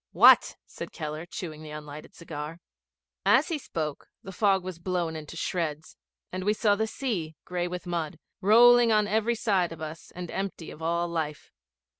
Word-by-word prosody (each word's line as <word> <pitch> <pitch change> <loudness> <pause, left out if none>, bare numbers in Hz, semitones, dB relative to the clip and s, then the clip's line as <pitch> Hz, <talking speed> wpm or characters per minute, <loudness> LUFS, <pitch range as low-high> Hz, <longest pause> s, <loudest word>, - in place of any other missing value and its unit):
'What?' - - +7
said - - -8
Keller, 155 +2 -5
chewing 160 -5 -6
the 155 - -9
unlighted 150 0 -9
cigar. 160 0 -7 0.6
As - - +4
he 325 -3 -1
spoke 155 - -4 0.2
the 195 - -7
fog 195 -1 +2
was 185 -2 -6
blown 175 -2 -1
into 155 +1 -7
shreds, 160 -4 -3 0.4
and 185 0 -4
we 210 +2 +3
saw 210 -1 +3
the 220 +2 0
sea, 190 - -3
gray 180 -1 -2
with 180 0 -5
mud, 170 -3 -3 0.2
rolling 235 +3 +7
on 210 -1 +4
every 220 +2 +1
side 195 -7 +1
of 165 - -8
us 155 +1 -7
and 175 -1 -6
empty 190 -4 -4
of 155 - -12
all 170 +1 0
life. 160 -3 -4
175 Hz, 175 wpm, -28 LUFS, 155-200 Hz, 0.6 s, What